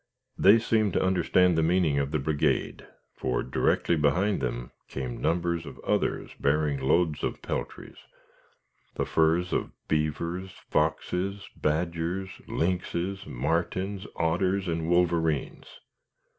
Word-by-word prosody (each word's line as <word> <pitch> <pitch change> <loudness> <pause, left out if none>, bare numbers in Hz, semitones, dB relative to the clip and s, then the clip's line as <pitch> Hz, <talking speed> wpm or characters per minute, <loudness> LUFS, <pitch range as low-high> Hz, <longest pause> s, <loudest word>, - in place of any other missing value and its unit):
They 100 +4 +7
seemed 110 -3 +1
to - - +2
understand 90 -1 +3
the 80 - +3
meaning 80 -3 +2
of 70 0 -1
the 75 - 0
brigade; 75 +1 0 0.3
for, 60 - -1
directly 65 +6 +1
behind 85 +6 +2
them - - -3 0.2
came 65 -3 -5
numbers 85 -1 0
of - - -10
others - - -1
bearing 75 0 +1
loads 75 +4 +1
of - - -2
peltries - - -5 1.0
the - - -1
furs 80 +3 +2
of - - 0 0.2
beavers, 85 +5 -1 0.2
foxes, 90 +5 0
badgers, 85 +4 -1 0.2
lynxes, 90 +2 -2
martens, 95 +9 -2
otters, 95 +4 +1
and 80 -1 -1
wolverines. 85 -4 +1
85 Hz, 115 wpm, -27 LUFS, 75-95 Hz, 1.0 s, They